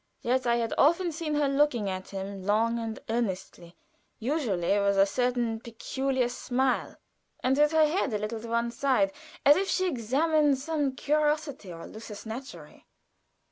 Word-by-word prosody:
Yet 255 +1 +1
I 235 - +4
had 230 -1 -1
often 340 +4 +4
seen 310 -1 -3
her 295 -1 +2
look 280 0 +3
at 190 -4 -3
him 195 0 -6
long 225 +4 +1
and 225 -1 -4
earnestly, 190 -6 -3 0.4
usually 215 - 0
with 200 0 +2
a 195 - +6
certain 240 0 0
peculiar 255 +3 -2
smile, 250 +1 -1 0.5
and 260 +1 +3
with 295 +1 +4
her 315 -1 +5
head 305 -3 0
a 210 - 0
little 215 +2 -4
to 230 - -8
one 235 +1 0
side 280 +3 +2 0.3
as 290 +1 +8
if 390 +1 -1
she 370 - +1
examined 295 +1 +2
some 290 -1 -1
curiosity 295 - 0
or 165 -1 -8
lusus 215 -1 -9
naturæ. 245 +5 -8
245 Hz, 160 wpm, -28 LUFS, 220-295 Hz, 0.5 s, as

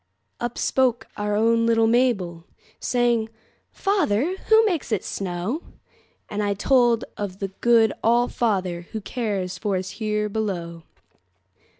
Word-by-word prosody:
Up 240 0 -3
spoke 255 -3 +1
our 205 0 -1
own 230 +2 +3
little 225 -1 +4
Mabel, 215 -8 +1 0.3
Saying, 240 -3 +1 0.4
"Father, 350 - +1
who 445 0 +6
makes 345 - -1
it 210 -4 0
snow?"And 200 - -6
I 205 -1 0
told 240 +1 +3
of 200 -2 -4
the 195 -1 -3
good 230 -3 +4
All 240 +2 +4
fatherWho 190 -2 -2
cares 195 -7 -3
for 200 -2 0
us 185 0 -4
here 210 -1 -1
below. 185 -6 -3
220 Hz, 120 wpm, -24 LUFS, 195-240 Hz, 0.4 s, who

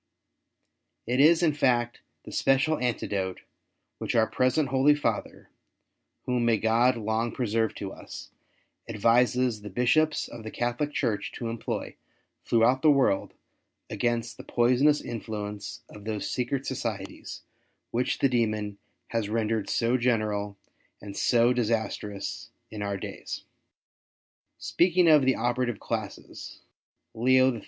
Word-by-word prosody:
It 125 +3 0
is, 160 +4 +6
in 155 -3 +3
fact, 120 -4 +1 0.2
the - - -10
special 135 +4 +2
antidote 100 -6 -2 0.6
which - - -3
our 110 -1 +5
present 130 +5 +1
Holy 135 +2 +4
Father 145 - -3 0.4
— - - -52
whom 125 -1 0
may 115 -1 +3
God 115 +4 +3
long 110 +1 -1
preserve 115 -3 -1
to 95 -2 -5
us - - -10 0.3
— - - -45
advises 120 +1 +2
the 105 - -8
Bishops 150 +9 +2
of 120 - -9
the 110 - -7
Catholic 120 +6 -2
Church 115 -8 -1
to 115 - -4
employ 115 0 -4 0.5
throughout 120 +3 +3
the 155 - +5
world 135 -9 +2 0.6
against 120 +2 -1
the - - -9
poisonous 130 +5 +3
influence 105 -1 -6
of 105 - -13
those 110 -2 -3
secret 130 +2 -2
societies, 110 -7 -5 0.5
which 125 +2 0
the 135 - +2
demon 110 -4 -1 0.3
has 115 -3 -2
rendered 110 -1 -1
so 120 +2 +2
general 105 -4 0 0.4
and 100 -1 -9
so 120 0 +3
disastrous 110 -4 -2 0.2
in 105 -1 -6
our 100 -1 -2
days. - - -7 1.1
Speaking 180 0 +2
of 150 -4 +6
the 130 - +3
operative 120 -1 -1
classes, - - -6 0.5
Leo 130 +3 +4
XIII. 115 - -5
120 Hz, 130 wpm, -27 LUFS, 110-130 Hz, 1.1 s, is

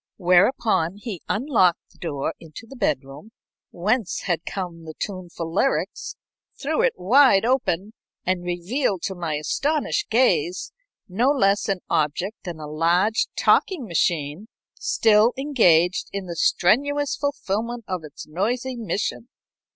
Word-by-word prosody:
Whereupon 185 -1 +3
he 205 -5 -6
unlocked 210 - +1
the - - -25
door 155 -2 -3
into 165 +7 -11
the 270 - -12
bedroom, 145 - -3 0.4
whence 205 +2 -1
had 175 -2 -2
come 175 -4 -5
the 155 -1 -8
tuneful 175 -4 -5
lyrics, 270 +8 -1 0.4
threw - - 0
it - - +3
wide 230 0 +5
open, 220 -6 0 0.3
and 185 -1 0
revealed 180 - -1
to 195 - -2
my 170 -4 -3
astonished 285 - -1
gaze 185 - +1 0.4
no 225 +8 +1
less 200 -9 +2
an 195 -2 -1
object 165 +8 -1
than 170 -3 -6
a 155 - -6
large 170 +8 +1
talking 360 - +2
machine 170 0 -1 0.3
still 220 +2 +3
engaged 185 - +3
in 200 -1 -4
the 170 -1 -6
strenuous 285 - +2
fulfilment 235 -4 -3
of 185 -3 -3
its 150 -2 -10
noisy 240 +10 -2
mission. 230 +1 -3
195 Hz, 130 wpm, -23 LUFS, 170-240 Hz, 0.4 s, wide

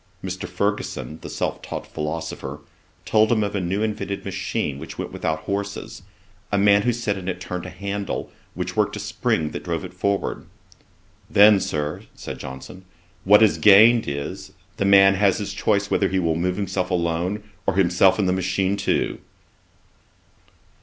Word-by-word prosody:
Mr. - - -5
Fergusson, 80 +1 -2
the - - -8
self - - -3
taught - - -6
philosopher, 75 +2 -5 0.5
told 110 0 +3
him 110 -3 +3
of 100 - -2
a 100 - 0
new 95 +4 -1
invented 105 -2 -3
machine 95 -6 -3
which 80 - -9
went - - -5
without 80 0 -2
horses: 100 +2 -4 0.5
a 100 - +2
man 100 0 +5
who 120 - +2
sat 110 -4 -2
in 90 - -9
it 90 -1 -3
turned 90 -1 -5
a - - -6
handle, 100 +2 -4 0.2
which - - -4
worked - - +1
a - - -5
spring 75 -2 -1
that - - -6
drove 85 +1 -3
it 90 - -10
forward. 100 +2 -2 0.8
'Then, 105 0 +7
Sir, 75 -4 -3
(said - - -7
Johnson,) 65 +8 -9 0.4
what 105 +3 +7
is 110 - +3
gained 110 +3 +7
is, 70 0 -5 0.2
the 100 - 0
man 100 0 +7
has 95 -1 +2
his 100 -1 -4
choice 100 +1 0
whether 100 - +2
he 95 - 0
will 85 -3 +1
move 90 +2 0
himself 95 -2 -2
alone, 90 +3 -1 0.2
or 100 - +2
himself 95 0 +4
and 100 -3 +1
the 90 - +2
machine 95 +1 0
too.' - - -1
95 Hz, 170 wpm, -23 LUFS, 90-100 Hz, 0.8 s, Then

